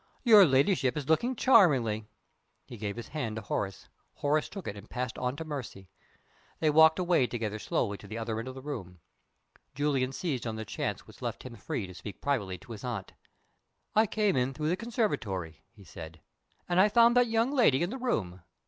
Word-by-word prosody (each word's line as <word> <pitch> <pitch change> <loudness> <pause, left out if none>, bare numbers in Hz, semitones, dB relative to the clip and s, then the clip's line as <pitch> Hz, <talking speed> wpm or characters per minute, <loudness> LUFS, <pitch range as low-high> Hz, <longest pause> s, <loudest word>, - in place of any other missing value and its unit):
"Your 215 -5 +8
ladyship 135 0 +2
is 145 -3 -4
looking 235 +11 +2
charmingly." 130 - +4 0.6
He 120 - -10
gave 105 -2 -4
his 120 - -8
hand 125 -8 -3
to 110 - -5
Horace. 95 -1 -3 0.3
Horace 150 +1 0
took 195 -4 -8
it, 100 - -4
and 100 +2 -12
passed 125 -2 -3
on 125 +1 -1
to 160 - -6
Mercy. 125 -11 -7 0.7
They 155 -2 +3
walked 160 +1 +6
away 175 -8 +2
together 110 -3 -3
slowly 100 -1 -1
to 100 - -12
the 110 +3 -6
other 115 -1 -3
end 115 - -6
of 130 - -7
the 130 - -9
room. 90 - -6 0.8
Julian 135 -2 0
seized 135 -5 -3
on 110 - -3
the 110 0 -5
chance - - -4
which - - -16
left - - -4
him 125 -2 -9
free 105 0 -4
to 90 - -10
speak 100 +3 -9
privately 105 -10 -1
to 120 +3 -15
his 110 -2 -8
aunt. 115 -6 -5 0.8
"I 215 +1 +5
came 210 -2 +1
in 130 +1 0
through 150 +2 -1
the 175 - +2
conservatory," 115 - -2
he 100 - -17
said. 80 -2 -10 0.5
"And 175 0 +2
I 205 +3 +6
found 235 +2 +5
that 245 0 +5
young 230 +3 +1
lady 225 - +4
in 175 - -2
the 265 - -5
room. 95 - -2
130 Hz, 200 wpm, -29 LUFS, 110-175 Hz, 0.8 s, Your